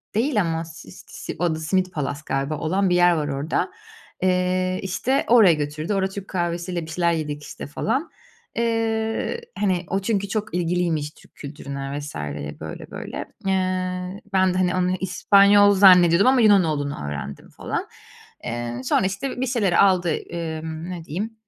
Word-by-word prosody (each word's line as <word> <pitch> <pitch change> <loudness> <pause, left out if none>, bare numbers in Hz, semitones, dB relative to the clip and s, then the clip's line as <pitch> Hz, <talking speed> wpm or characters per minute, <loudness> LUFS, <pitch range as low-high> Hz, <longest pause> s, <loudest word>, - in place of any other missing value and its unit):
değil 230 -1 +2
ama 165 -2 -2
si 160 - -12
si - - -9
o 170 -3 +1
da - - -6
Simit 185 +3 0
Palace 145 -1 -3
galiba 135 +3 -2
olan 185 +5 0
bir 175 - +3
yer 175 0 +5
var 150 -3 -1
orada. 145 +6 -1 0.5
Eee, 185 0 +1
işte, 240 +8 0
oraya 220 -8 +7
götürdü, 155 +5 -3
orada 190 -1 +1
Türk 200 0 -7
kahvesiyle 175 0 -2
bir - - -11
şeyler 170 0 +1
yedik, 150 -2 -3
işte, 150 0 -8
falan. 230 - -2 0.5
Eee, 225 - -1 0.2
hani, 185 -3 0
o 195 - 0
çünkü 200 0 -1
çok 215 -3 -3
ilgiliymiş 170 -4 0
Türk - - -22
kültürüne 140 -1 -6
vs. 145 +1 -8 0.5
böyle, 80 - -8
böyle. - - -7 0.3
Eee, 185 0 -1
ben 190 -1 +3
de, 185 - -2
hani, 180 -1 +1
onu 185 0 +1
İspanyol 200 +2 +5
zannediyordum 185 0 +6
ama 260 -1 +5
Yunan 205 -4 +6
olduğunu 145 - -2
öğrendim, 70 -1 -6
falan. - - -4 0.6
Eee, 120 0 -4
sonra, 185 +8 +2
işte, 245 +7 -3
bir 260 - +1
şeyleri 220 -8 +1
aldı, 185 -3 +4
emm, 160 0 -5
ne 175 -2 -6
diyeyim. 210 +9 -4
180 Hz, 160 wpm, -23 LUFS, 155-195 Hz, 0.6 s, oraya